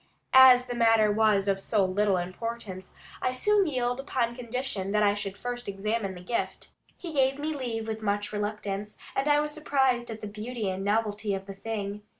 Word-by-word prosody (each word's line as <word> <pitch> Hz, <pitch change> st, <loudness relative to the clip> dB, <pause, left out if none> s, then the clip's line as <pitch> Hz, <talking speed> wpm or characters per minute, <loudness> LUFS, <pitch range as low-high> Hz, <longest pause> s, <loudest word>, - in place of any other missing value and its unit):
As 255 Hz, -1 st, +8 dB
the 245 Hz, -, -4 dB
matter 225 Hz, -2 st, +4 dB
was 210 Hz, -2 st, +3 dB
of 195 Hz, -1 st, +1 dB
so 200 Hz, 0 st, +1 dB
little 195 Hz, +1 st, +1 dB
importance, 185 Hz, +1 st, -5 dB, 0.3 s
I 255 Hz, -, +1 dB
soon 400 Hz, +9 st, +2 dB
yielded 250 Hz, -2 st, -1 dB
upon 240 Hz, -4 st, -1 dB
condition 235 Hz, -5 st, -3 dB
that 210 Hz, 0 st, +3 dB
I 205 Hz, -1 st, +4 dB
should 200 Hz, -1 st, -5 dB
first 245 Hz, +2 st, -5 dB
examine 200 Hz, 0 st, -2 dB
the 180 Hz, -, -10 dB
gift. 230 Hz, +6 st, -3 dB, 0.3 s
He 340 Hz, -3 st, -7 dB
gave 270 Hz, -1 st, +2 dB
me 305 Hz, +2 st, -2 dB
leave 230 Hz, -5 st, -3 dB
with 220 Hz, 0 st, -4 dB
much 205 Hz, 0 st, -1 dB
reluctance, 210 Hz, 0 st, -4 dB, 0.2 s
and 270 Hz, +2 st, 0 dB
I 295 Hz, 0 st, +5 dB
was 300 Hz, 0 st, -1 dB
surprised 265 Hz, -5 st, +1 dB
at 225 Hz, -1 st, -7 dB
the 210 Hz, -, -5 dB
beauty 215 Hz, 0 st, -4 dB
and 190 Hz, +1 st, -4 dB
novelty 210 Hz, 0 st, 0 dB
of 190 Hz, 0 st, -6 dB
the 195 Hz, -, -7 dB
thing. 205 Hz, 0 st, -5 dB
220 Hz, 190 wpm, -28 LUFS, 200-250 Hz, 0.3 s, As